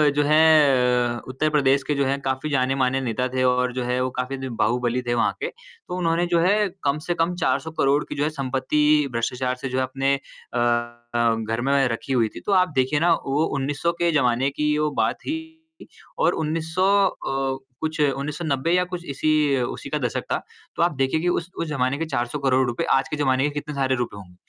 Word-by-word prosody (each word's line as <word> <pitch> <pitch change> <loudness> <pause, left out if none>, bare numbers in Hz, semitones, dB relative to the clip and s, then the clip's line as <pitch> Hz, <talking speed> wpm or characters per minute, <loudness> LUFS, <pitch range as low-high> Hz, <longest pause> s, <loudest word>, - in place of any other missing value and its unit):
जो 145 - +3
है, 135 -6 +4
उत्तर 130 +4 0
प्रदेश 140 -2 +2
के 150 - +1
जो 140 0 +1
है 135 +1 0
काफ़ी 130 +3 -1
जाने-माने 135 -1 +1
नेता 125 0 -1
थे 130 0 +1
और 125 0 +2
जो 125 0 -2
है 125 +1 -1
वो 130 - -1
काफ़ी 130 +2 -2
बाहुबली 120 +2 0
थे 120 -1 -2
वहाँ 120 - +2
के। - - -1
तो 465 - -10
उन्होंने 170 -1 +1
जो 170 - +4
है 205 +4 +3 0.2
कम 140 +1 +1
से 175 - +1
कम 170 +2 +1
400 160 -2 -1
करोड़ 140 +2 +3
की - - -4
जो 145 - 0
है 150 - +1
संपत्ति 150 +1 +1
भ्रष्टाचार 125 +2 -1
से 135 - -3
जो 130 +1 -1
अपने 135 +1 0
अ 130 -2 -8 0.6
अ, 120 -1 +3
घर 115 +1 -3
में 135 +1 +2
रखी 115 +3 -3
हुई 120 -3 +3
थी। - - -6
तो - - -1
आप 185 -1 +4
देखिए 130 +3 +2
ना 170 +2 +4
वो 140 +3 +1
1900 145 +5 -1
के 170 0 +3
ज़माने 130 -2 +2
की 150 +1 0
वो 150 0 +1
बात 110 0 +2
थी 320 +1 -4 0.7
और - - +3
1900 160 +3 -1 0.2
अ, 135 -5 -3 0.2
कुछ 155 0 -3
1990 145 +1 -1
या 180 +1 +3
कुछ 175 -1 -5
इसी 145 +3 0 0.3
उसी 120 - -4
का - - -1
दशक - - -2
था। - - 0 0.3
तो - - +1
आप 170 -3 +1
देखिए 135 +3 +1
कि 175 - -1
उस 175 0 -1
उस 165 - -2
जमाने 135 -2 0
के 165 - -2
400 130 -2 -2
करोड़ 130 -1 +2
रुपए 120 0 -2
आज 135 0 +1
के 150 - -3
जमाने 130 -2 +2
के 145 - +2
कितने 150 0 -5
सारे 135 -1 +1
रुपए 120 -4 -4
होंगे, 90 -3 -13
135 Hz, 215 wpm, -23 LUFS, 125-155 Hz, 0.7 s, है